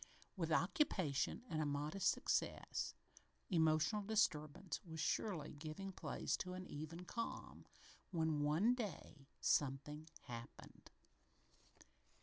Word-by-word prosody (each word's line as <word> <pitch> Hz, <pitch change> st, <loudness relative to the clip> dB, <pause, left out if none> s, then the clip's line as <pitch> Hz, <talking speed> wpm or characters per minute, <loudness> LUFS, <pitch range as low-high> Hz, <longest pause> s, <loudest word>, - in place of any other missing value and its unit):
With 165 Hz, -4 st, -1 dB
occupation 175 Hz, -, +2 dB
and 155 Hz, -6 st, 0 dB
a -, -, +1 dB
modest 145 Hz, +6 st, +1 dB
success, -, -, 0 dB, 0.6 s
emotional 160 Hz, +4 st, +4 dB
disturbance 185 Hz, -5 st, +1 dB
was 160 Hz, -2 st, -7 dB
surely 160 Hz, -1 st, 0 dB
giving 155 Hz, +6 st, -5 dB
place -, -, -1 dB
to 180 Hz, -1 st, -3 dB
an 185 Hz, 0 st, -5 dB
even 160 Hz, +4 st, -6 dB
calm, 230 Hz, +5 st, -4 dB, 0.4 s
when, 160 Hz, -4 st, +1 dB
one 160 Hz, +11 st, +4 dB
day, 175 Hz, -, -5 dB
something 150 Hz, +3 st, +1 dB
happened. 120 Hz, -2 st, -9 dB
160 Hz, 105 wpm, -41 LUFS, 150-190 Hz, 0.6 s, emotional